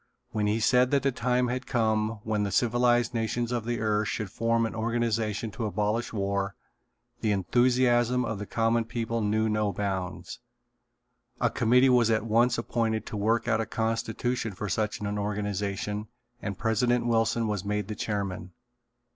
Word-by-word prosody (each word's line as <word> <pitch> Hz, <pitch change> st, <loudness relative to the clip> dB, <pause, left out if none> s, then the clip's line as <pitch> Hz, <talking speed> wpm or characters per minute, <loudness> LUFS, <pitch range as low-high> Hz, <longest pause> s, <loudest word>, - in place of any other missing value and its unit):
When 105 Hz, -1 st, 0 dB
he 105 Hz, +2 st, +1 dB
said 125 Hz, +2 st, +4 dB
that 140 Hz, 0 st, +2 dB
the 135 Hz, -, +2 dB
time 125 Hz, 0 st, +1 dB
had 125 Hz, +1 st, -3 dB
come 110 Hz, -3 st, 0 dB
when 110 Hz, -1 st, -1 dB
the 100 Hz, -, 0 dB
civilized 120 Hz, +1 st, +2 dB
nations 115 Hz, +1 st, -1 dB
of 120 Hz, -2 st, -2 dB
the 120 Hz, -1 st, -1 dB
earth 105 Hz, -1 st, +1 dB
should 105 Hz, -4 st, -3 dB
form 115 Hz, +1 st, +1 dB
an 115 Hz, -, -3 dB
organization 115 Hz, -1 st, -1 dB
to 110 Hz, +2 st, -4 dB
abolish 105 Hz, +3 st, -1 dB
war 100 Hz, -2 st, -1 dB, 0.6 s
the 110 Hz, -, 0 dB
enthusiasm 120 Hz, +4 st, +2 dB
of 110 Hz, -3 st, -3 dB
the 105 Hz, -, -6 dB
common 115 Hz, 0 st, +1 dB
people 115 Hz, 0 st, -2 dB
knew 110 Hz, +1 st, +1 dB
no 105 Hz, -1 st, +1 dB
bounds. 95 Hz, -2 st, -4 dB, 1.0 s
A -, -, +2 dB
committee 125 Hz, +3 st, +4 dB
was 125 Hz, -3 st, +4 dB
at 110 Hz, -1 st, +1 dB
once 115 Hz, +2 st, +3 dB
appointed 115 Hz, -1 st, -1 dB
to 115 Hz, -, -6 dB
work 115 Hz, +3 st, +1 dB
out 110 Hz, -1 st, +2 dB
a 110 Hz, -, -3 dB
constitution 115 Hz, 0 st, -2 dB
for 105 Hz, +3 st, -5 dB
such 105 Hz, +3 st, -1 dB
an 105 Hz, 0 st, -3 dB
organization 105 Hz, 0 st, -2 dB, 0.3 s
and 100 Hz, -2 st, -4 dB
President 115 Hz, +2 st, +1 dB
Wilson 115 Hz, -1 st, +1 dB
was 105 Hz, -3 st, -2 dB
made 105 Hz, -1 st, -2 dB
the 105 Hz, -, -4 dB
chairman. 100 Hz, -4 st, -3 dB
110 Hz, 165 wpm, -28 LUFS, 105-120 Hz, 1.0 s, said